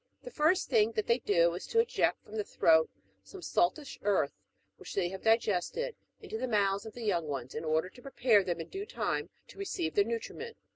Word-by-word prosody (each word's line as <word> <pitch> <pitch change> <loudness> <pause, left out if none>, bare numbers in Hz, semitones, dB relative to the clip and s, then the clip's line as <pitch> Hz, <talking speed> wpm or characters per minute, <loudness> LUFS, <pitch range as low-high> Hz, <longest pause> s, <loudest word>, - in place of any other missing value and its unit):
The - - -8
first 325 0 +2
thing 225 -3 +3
that 215 - -1
they 235 +2 +2
do 170 -6 +3
is 175 - -6
to 455 - +2
eject 460 - +1
from 215 - -11
the 215 - -1
throat 160 -4 +4 0.3
some 95 - -12
saltish 265 - 0
earth, 195 -8 +1 0.4
which - - -9
they 180 -3 +1
have 190 +1 -7
digested, 225 - +1 0.2
into 440 - -6
the 255 - -1
mouths 200 -2 +1
of 220 - -9
the 240 - -8
young 170 -6 0
ones, 135 -3 -4
in 155 - -4
order 160 +2 +1
to 245 - -15
prepare 245 -6 +3
them 175 -2 -2
in 165 - -6
due 395 +2 -6
time - - -2 0.2
to - - -14
re 395 - -3
ceive 160 - -2
their 205 - +4
nutriment. 235 - -5
210 Hz, 220 wpm, -31 LUFS, 175-255 Hz, 0.4 s, throat